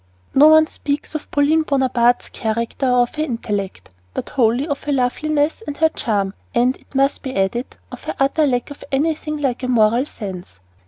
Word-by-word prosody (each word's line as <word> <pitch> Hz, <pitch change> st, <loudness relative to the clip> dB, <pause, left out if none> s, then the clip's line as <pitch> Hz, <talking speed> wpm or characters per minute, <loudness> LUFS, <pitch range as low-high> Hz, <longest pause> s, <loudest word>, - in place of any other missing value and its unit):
No 290 Hz, +3 st, +7 dB
one 315 Hz, 0 st, +7 dB
speaks 290 Hz, -1 st, -4 dB
of 310 Hz, -, -5 dB
Pauline 295 Hz, +3 st, +3 dB
Bonaparte's 255 Hz, -5 st, +1 dB
character 230 Hz, +4 st, -2 dB
or 250 Hz, -1 st, +4 dB
of 240 Hz, -, -6 dB
her 305 Hz, -, +1 dB
intellect, 205 Hz, -, -4 dB, 0.2 s
but -, -, -4 dB
wholly 245 Hz, +2 st, +2 dB
of 285 Hz, -3 st, -4 dB
her 295 Hz, -, -1 dB
loveliness 290 Hz, -, 0 dB
and 290 Hz, -, -5 dB, 0.2 s
charm, 200 Hz, -4 st, -1 dB, 0.2 s
and, 245 Hz, +2 st, +3 dB
it -, -, -24 dB
must 275 Hz, +1 st, +2 dB
be 260 Hz, -2 st, -5 dB
added, 195 Hz, +6 st, -1 dB
of -, -, -10 dB
her -, -, -3 dB
utter 285 Hz, +3 st, +2 dB
lack 245 Hz, +1 st, -1 dB
of 285 Hz, -, -10 dB
anything 305 Hz, +2 st, -1 dB
like 270 Hz, -4 st, -1 dB
a 255 Hz, -, -2 dB
moral 235 Hz, +1 st, +3 dB
sense. 185 Hz, -, -8 dB
265 Hz, 180 wpm, -20 LUFS, 235-290 Hz, 0.2 s, No